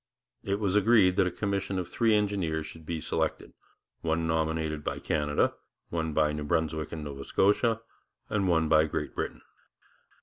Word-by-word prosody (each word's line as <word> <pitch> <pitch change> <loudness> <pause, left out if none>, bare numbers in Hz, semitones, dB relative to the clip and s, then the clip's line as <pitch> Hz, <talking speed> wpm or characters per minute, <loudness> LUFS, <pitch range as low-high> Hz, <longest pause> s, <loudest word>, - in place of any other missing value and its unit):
It 100 +1 -1
was 100 -2 0
agreed 105 -3 +5
that 95 -2 +4
a - - -1
commission 100 0 -2
of 90 -2 -2
three 115 -2 +2
engineers 95 -7 0
should 80 0 -11
be 80 -2 -3
selected, - - -2 0.5
one 80 0 0
nominated 80 -1 -1
by - - -2
Canada, 75 -1 +1 0.4
one 80 -1 -1
by 75 0 +2
New 75 0 -3
Brunswick 80 0 -1
and 80 -2 -5
Nova 70 -2 -6
Scotia, 110 - +2 0.5
and 100 -3 0
one 80 -2 +3
by 80 0 +5
Great 75 - -3
Britain. - - -4
80 Hz, 165 wpm, -29 LUFS, 80-100 Hz, 0.5 s, agreed